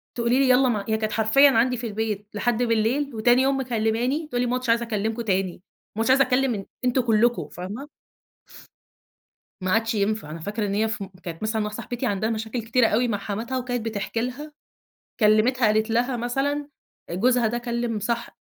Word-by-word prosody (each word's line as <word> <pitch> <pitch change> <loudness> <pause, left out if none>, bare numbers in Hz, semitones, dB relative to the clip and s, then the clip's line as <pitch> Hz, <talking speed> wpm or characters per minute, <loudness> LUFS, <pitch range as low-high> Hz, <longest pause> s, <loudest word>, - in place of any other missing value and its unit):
تقولي 240 +2 +2
لي 275 - +4
يالّا 255 +1 +5
مع 210 -4 -1
هي 220 - +2
كانت 215 0 -2
حرفيًا 225 +7 +5
عندي 250 +2 +2
في 235 0 -4
البيت 210 -1 -3
لحد 240 +3 0
بالليل، 235 +4 0
وتاني 240 +3 +4
يوم 270 0 +2
مكلّماني 245 +5 -1
تقول 245 -5 -1
لي: 250 - +1
"ما 245 - 0
عدتش 255 -1 -3
عايزة 235 +1 +3
أكلّمكم 220 +1 -2
تاني، 190 -4 0 0.4
ما - - -5
عدتش 230 - 0
عايزة 275 +1 +6
أكلّم 250 -5 0 0.2
أنتم 250 +1 +2
كلكم." 235 +1 +2
فاهمة؟ 205 +11 -7 1.7
ما 185 0 -1
عادش 225 0 +1
ينفع. 205 -5 -1
أنا 165 - -6
فاكرة 205 +5 -3
إن 200 - -2
هي 220 +2 +2
ف 215 -2 -3 0.2
كانت 170 +3 -7
مثلًا 220 0 0
مع 210 - -2
صاحبتي 240 +4 -5
عندها 215 -1 0
مشاكل 225 +2 -3
كتيرة 230 +1 +2
أوي 240 +3 +1
مع 205 -3 -1
حماتها، 225 +6 -4
وكانت 245 -2 -3
بتحكي 225 +1 -3
لها. 275 +5 -5 0.7
كلّمِتها 220 +4 +4
قالت 215 +1 +2
لها 245 +3 +1
مثلًا 275 +5 -1 0.4
آآ، - - -5
جوزها 240 +4 +3
ده 240 +2 -1
كلّم 235 -2 -2
صح 235 +3 -2
أ - - -18
230 Hz, 195 wpm, -24 LUFS, 215-250 Hz, 1.7 s, عايزة